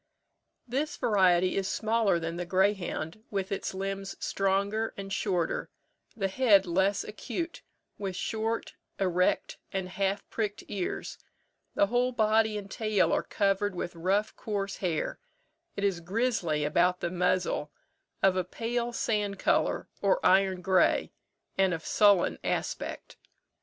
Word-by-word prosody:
This 275 +6 -2
variety 185 -6 +3
is 195 -1 0
smaller 220 -4 +2
than 165 0 -3
the 175 - -2
greyhound, 190 0 0
with 195 -2 -2
its 195 - -2
limbs 195 0 -4
stronger 200 +3 0
and 195 0 -5
shorter, 180 -5 -1 0.5
the 195 -3 +1
head 200 -2 +4
less 190 +3 +1
acute, 330 +10 -5 0.4
with 195 -2 -3
short, 225 +4 -2 0.3
erect, 180 -1 +1
and 190 -1 -3
half 195 +1 -1
pricked 210 -2 -2
ears: 190 -3 -4 0.6
the - - +4
whole 245 +4 +1
body 220 -2 +2
and 200 -1 -7
tail 215 -2 +1
are - - +2
covered 200 -1 0
with 175 - -4
rough 195 +6 0
coarse 200 -2 -3
hair; 175 -5 -2 0.6
it 200 - -3
is 195 -3 +1
grizzly 180 -5 0
about 175 +4 +2
the 175 - -1
muzzle, 180 -4 0 0.5
of 190 -1 +5
a 185 - +1
pale 235 +6 -2
sand 210 -4 -1
colour, - - +1
or - - +3
iron 190 -1 +4
grey, 190 -1 +3 0.5
and 190 -2 +4
of 160 - -9
sullen 205 -4 +4
aspect. - - -3
195 Hz, 135 wpm, -29 LUFS, 185-215 Hz, 0.6 s, of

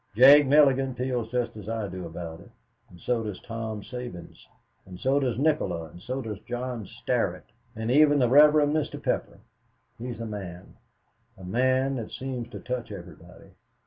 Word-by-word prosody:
Jake 140 +4 +8
Mulligan 135 -2 +4
feels 125 -2 -2
just 120 -2 -2
as 105 0 -8
I 110 -2 -2
do 90 -2 -6
about 80 0 -7
it, - - -15 0.4
and 90 - -15
so 120 +5 0
does 105 -4 -5
Tom 110 -2 -5
Sabins, 120 -9 -9 0.4
and 90 -1 -11
so 135 +2 +2
does 125 -5 -1
Nikola 100 - 0
and 85 - -13
so 130 +6 -4
does 105 -3 -5
John 120 -2 -5
Starrett, - - -2 0.3
and 110 +2 -2
even 145 +1 +5
the 125 -3 +3
Rev. 145 +4 +8 0.2
Mr. 155 -1 -1
Pepper. - - -2 0.6
He's 120 0 -6
a 115 - -4
man 95 -5 -8 0.6
a 95 - -12
man 130 +7 +1
that 115 -3 -5
seems 125 -3 -5
to - - -8
touch 125 -3 -4
everybody. 95 -4 -12
120 Hz, 170 wpm, -27 LUFS, 105-130 Hz, 0.6 s, Jake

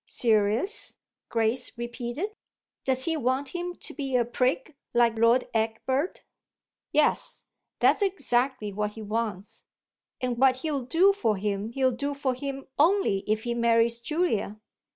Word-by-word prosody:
"Serious?" 225 - +1 0.3
Grace 230 +2 0
repeated. 240 - -4 0.5
"Does 260 -1 +2
he 330 - 0
want 265 0 0
him 355 +2 -4
to - - -9
be 275 -3 -3
a 240 -1 +3
prig 260 +5 -1 0.2
like 235 -2 +3
Lord 235 +2 +5
Egbert?" 235 +8 -1 0.7
"Yes 305 -1 +1 0.3
that's - - +4
exactly 260 - 0
what 210 +1 -2
he 220 - -8
wants. 210 -2 -3 0.5
And 245 -2 -2
what 265 -1 +5
he'll 285 -5 -1
do 360 +9 +4
for 225 - 0
him 200 +1 -2
he'll 260 0 +2
do 280 +4 -3
for 275 -2 0
him 275 +1 -5
only 335 - +3
if 215 +1 0
he 240 - -1
marries 235 0 +2
Julia." 235 - -1
250 Hz, 140 wpm, -27 LUFS, 225-285 Hz, 0.7 s, Lord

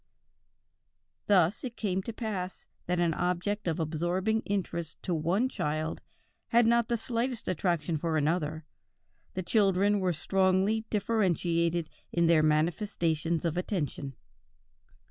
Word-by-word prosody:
"Thus 190 -1 +3
it 245 -3 -5
came 190 -3 -1
to 230 - -5
pass 205 -5 -4 0.2
that 180 0 0
an 170 -2 +2
object 180 +4 -1
of 165 0 0
absorbing 175 +7 0
interest 170 -5 -2
to 180 - -1
one 175 +10 +1
child 155 - -2 0.5
had 235 0 +4
not 235 0 +3
the 235 - 0
slightest 235 +1 -2
attraction 170 -2 0
for 160 +1 -1
another; 155 0 0 0.7
the 185 - -2
children 200 +1 +3
were 185 -1 +1
strongly 190 +5 +1
differentiated 175 -6 +1 0.2
in 170 -1 +2
their 165 -1 +5
manifestations 165 +1 +1
of 165 0 -1
attention...." 150 - -3
180 Hz, 125 wpm, -29 LUFS, 165-205 Hz, 0.7 s, their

